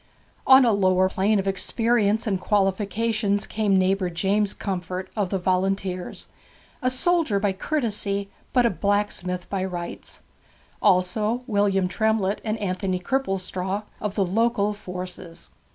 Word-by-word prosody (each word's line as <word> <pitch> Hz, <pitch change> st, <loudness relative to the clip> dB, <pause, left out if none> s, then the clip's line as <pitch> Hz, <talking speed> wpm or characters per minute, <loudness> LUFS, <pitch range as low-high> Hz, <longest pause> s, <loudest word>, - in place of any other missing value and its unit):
On 265 Hz, 0 st, +8 dB
a 235 Hz, -, +4 dB
lower 185 Hz, -2 st, +3 dB
plane 200 Hz, +3 st, +2 dB
of 195 Hz, 0 st, -1 dB
experience 220 Hz, +3 st, +1 dB
and 195 Hz, -4 st, -1 dB
qualifications 205 Hz, +2 st, 0 dB
came 210 Hz, -3 st, +1 dB
neighbour 190 Hz, 0 st, +1 dB
James 195 Hz, +4 st, +1 dB
Comfort, 185 Hz, -1 st, -4 dB
of 205 Hz, -4 st, 0 dB
the 195 Hz, -, 0 dB
Volunteers, 185 Hz, 0 st, -1 dB, 0.5 s
a 255 Hz, -, +2 dB
soldier 275 Hz, -, +1 dB
by 200 Hz, -1 st, +1 dB
courtesy, 200 Hz, -5 st, -2 dB, 0.2 s
but 250 Hz, -2 st, +3 dB
a 235 Hz, -, +3 dB
blacksmith 185 Hz, -1 st, -1 dB
by 195 Hz, -2 st, -2 dB
rights; 175 Hz, -2 st, -6 dB, 0.6 s
also 210 Hz, +5 st, +2 dB
William 200 Hz, -5 st, +2 dB
Tremlett 215 Hz, 0 st, 0 dB
and 215 Hz, 0 st, -1 dB
Anthony 185 Hz, -2 st, -2 dB
Cripplestraw, 190 Hz, -3 st, -2 dB, 0.2 s
of 205 Hz, -1 st, -3 dB
the 195 Hz, -, +2 dB
local 210 Hz, +2 st, +1 dB
forces. 180 Hz, -3 st, -8 dB
200 Hz, 130 wpm, -24 LUFS, 185-215 Hz, 0.6 s, On